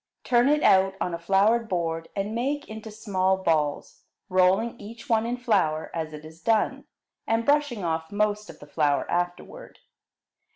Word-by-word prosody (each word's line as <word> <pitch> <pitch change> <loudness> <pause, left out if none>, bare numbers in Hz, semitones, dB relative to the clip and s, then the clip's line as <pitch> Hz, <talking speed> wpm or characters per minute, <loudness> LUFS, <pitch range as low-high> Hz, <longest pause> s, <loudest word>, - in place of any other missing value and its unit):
Turn 245 +2 +3
it 300 0 +2
out 190 0 +4
on 180 - -2
a 170 - -4
floured 205 +6 +2
board, 165 -2 -2
and 200 +2 -2
make 280 +5 -2
into 220 0 -8
small 190 -3 0
balls, 155 -5 -1 0.3
rolling 185 +5 +2
each 230 +5 -10
one 225 -2 +2
in 245 +1 -2
flour 190 -11 0
as 160 -2 -3
it 150 0 -10
is 160 +2 -13
done, 225 -2 +1 0.4
and 225 +1 +1
brushing 290 -8 +1
off 160 -1 -2
most 210 0 -1
of - - -11
the - - -13
flour 145 -1 0
afterward. 175 - -4
195 Hz, 165 wpm, -26 LUFS, 170-230 Hz, 0.4 s, out